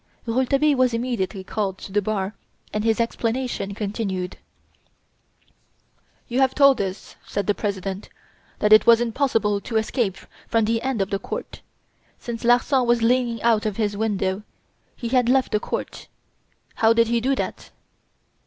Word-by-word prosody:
Rouletabille 270 Hz, +5 st, +2 dB
was 255 Hz, -2 st, +2 dB
immediately 230 Hz, -5 st, -2 dB
called 195 Hz, -1 st, -3 dB
to 195 Hz, -, -10 dB
the 205 Hz, +1 st, +2 dB
bar 200 Hz, -1 st, -2 dB, 0.4 s
and 210 Hz, -, -1 dB
his 225 Hz, 0 st, +1 dB
examination 230 Hz, -3 st, -2 dB
continued. 195 Hz, -3 st, -3 dB, 1.9 s
"You 245 Hz, +1 st, -1 dB
have 265 Hz, -1 st, +3 dB
told 275 Hz, -4 st, +5 dB
us," 190 Hz, 0 st, -6 dB
said 200 Hz, -, -3 dB
the 205 Hz, -, +2 dB
President, 195 Hz, -1 st, -4 dB, 0.5 s
"that 210 Hz, 0 st, +4 dB
it 215 Hz, -, +6 dB
was 230 Hz, -1 st, +7 dB
impossible 225 Hz, -4 st, 0 dB
to 225 Hz, -, -2 dB
escape 220 Hz, -3 st, -1 dB, 0.3 s
from 225 Hz, -2 st, +2 dB
the 225 Hz, +1 st, 0 dB
end 260 Hz, -6 st, 0 dB
of 190 Hz, -, -8 dB
the 195 Hz, -, 0 dB
court. -, -, -6 dB, 0.6 s
Since 235 Hz, -1 st, -6 dB
Larsan 245 Hz, +2 st, +3 dB
was 240 Hz, -1 st, +3 dB
leaning 240 Hz, -1 st, +1 dB
out 225 Hz, -2 st, +3 dB
of 210 Hz, -, -4 dB
his 210 Hz, -2 st, 0 dB
window, 200 Hz, -2 st, -1 dB, 0.5 s
he 235 Hz, -, -5 dB
had 250 Hz, -1 st, +2 dB
left 260 Hz, 0 st, +2 dB
the 210 Hz, -, +2 dB
court. -, -, -5 dB, 0.7 s
How 225 Hz, 0 st, +5 dB
did 230 Hz, 0 st, +4 dB
he 235 Hz, 0 st, +1 dB
do 270 Hz, +3 st, +1 dB
that?" -, -, -5 dB
225 Hz, 155 wpm, -23 LUFS, 205-245 Hz, 1.9 s, was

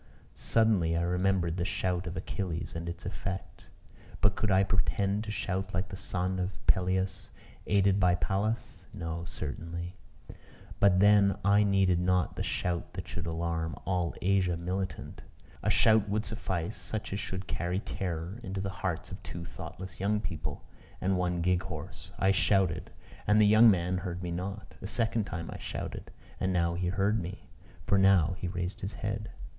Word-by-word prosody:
Suddenly 100 Hz, -8 st, +2 dB
I 85 Hz, -, +1 dB
remembered 90 Hz, -1 st, +1 dB
the 85 Hz, -, 0 dB
shout 90 Hz, 0 st, -1 dB
of 90 Hz, -, -4 dB
Achilles, 90 Hz, -4 st, -3 dB
and 85 Hz, +1 st, -4 dB
its 85 Hz, -, -7 dB
effect. 95 Hz, -1 st, -5 dB, 0.5 s
But 100 Hz, -1 st, +4 dB
could 110 Hz, -, 0 dB
I 95 Hz, 0 st, +5 dB
pretend 100 Hz, +1 st, +1 dB
to -, -, -5 dB
shout 95 Hz, -1 st, -2 dB
like 95 Hz, +1 st, -1 dB
the 95 Hz, -, -6 dB
son 95 Hz, 0 st, -1 dB
of 90 Hz, +1 st, -2 dB
Peleus, 95 Hz, +1 st, +1 dB, 0.4 s
aided 100 Hz, -1 st, +4 dB
by 90 Hz, -2 st, +4 dB
Pallas? 100 Hz, +5 st, -2 dB
No, 85 Hz, 0 st, -4 dB
certainly: 85 Hz, +4 st, -5 dB, 0.8 s
but 95 Hz, -2 st, +5 dB
then 100 Hz, -1 st, +6 dB
I 100 Hz, +1 st, +6 dB
needed 95 Hz, -3 st, +3 dB
not 90 Hz, -1 st, +2 dB
the -, -, -3 dB
shout 85 Hz, -1 st, -2 dB
that -, -, -6 dB
should 85 Hz, 0 st, -4 dB
alarm 80 Hz, -1 st, -2 dB
all 90 Hz, -3 st, 0 dB
Asia 90 Hz, -2 st, +2 dB
militant; 95 Hz, +3 st, -4 dB, 0.4 s
a -, -, 0 dB
shout 110 Hz, -2 st, +5 dB
would 105 Hz, +2 st, 0 dB
suffice, 95 Hz, -3 st, -3 dB
such 110 Hz, -2 st, -4 dB
as 100 Hz, -, -1 dB
should 95 Hz, -1 st, -4 dB
carry 90 Hz, +1 st, -2 dB
terror 90 Hz, 0 st, -3 dB
into 95 Hz, -3 st, -4 dB
the 100 Hz, 0 st, -2 dB
hearts 95 Hz, -4 st, -3 dB
of -, -, -7 dB
two 85 Hz, -1 st, -7 dB
thoughtless 85 Hz, +4 st, -8 dB
young 105 Hz, +2 st, +1 dB
people, 75 Hz, -7 st, -4 dB, 0.4 s
and 95 Hz, +1 st, +1 dB
one 90 Hz, -1 st, 0 dB
gig 90 Hz, 0 st, +3 dB
horse. 85 Hz, -6 st, -7 dB
I 95 Hz, -, +4 dB
shouted 95 Hz, -3 st, +2 dB, 0.4 s
and 105 Hz, +1 st, +5 dB
the 105 Hz, -, +7 dB
young 110 Hz, +3 st, +8 dB
man 90 Hz, -1 st, +2 dB
heard 90 Hz, -1 st, -4 dB
me 90 Hz, -, -3 dB
not. 95 Hz, +4 st, -5 dB
A 100 Hz, -, -4 dB
second 115 Hz, -1 st, 0 dB
time 85 Hz, -3 st, -5 dB
I -, -, -8 dB
shouted -, -, -5 dB, 0.3 s
and 95 Hz, -, +1 dB
now 85 Hz, -2 st, +2 dB
he 90 Hz, +1 st, -1 dB
heard 100 Hz, +3 st, +1 dB
me, 90 Hz, +1 st, -8 dB, 0.4 s
for 100 Hz, -, +3 dB
now 95 Hz, -3 st, +5 dB
he 90 Hz, -, -2 dB
raised 90 Hz, +1 st, -3 dB
his 95 Hz, +2 st, -4 dB
head. 105 Hz, +1 st, -3 dB
95 Hz, 170 wpm, -30 LUFS, 85-100 Hz, 0.8 s, young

